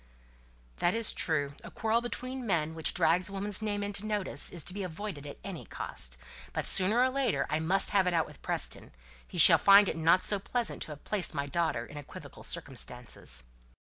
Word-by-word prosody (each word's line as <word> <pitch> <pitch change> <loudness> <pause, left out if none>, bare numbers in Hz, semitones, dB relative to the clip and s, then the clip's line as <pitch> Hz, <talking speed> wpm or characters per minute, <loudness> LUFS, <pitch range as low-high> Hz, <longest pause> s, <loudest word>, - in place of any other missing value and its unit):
"That's 220 +5 +1
true. 145 -4 -1
A - - -9
quarrel 225 +1 0
between 255 +2 -5
men 160 -5 0
which 160 -1 +1
drags 180 +4 +2
a - - -11
woman's 200 +1 -1
name 205 -1 -2
into 200 0 -3
notice 210 -2 0
is 170 -4 -4
to 180 - -1
be 205 - -5
avoided 180 -4 -6
at 145 - -9
any 190 -5 -7
cost. - - -1 0.4
But - - -2
sooner 195 +5 +3
or 260 - +3
later 260 -4 0
I 155 - +1
must 185 +5 +2
have 195 -2 +3
it 180 - +1
out 165 - +2
with - - -15
Preston. - - -3 0.3
He - - -9
shall - - +9
find 200 0 +7
it - - -2
not 165 +3 +3
so 205 - 0
pleasant 235 +3 -3
to - - -4
have 145 - -15
placed 195 -7 -2
my 140 -1 -1
daughter 155 -5 -1
in 150 - -11
equivocal 145 - -11
circumstances." 60 -1 -1
185 Hz, 200 wpm, -30 LUFS, 160-210 Hz, 0.4 s, shall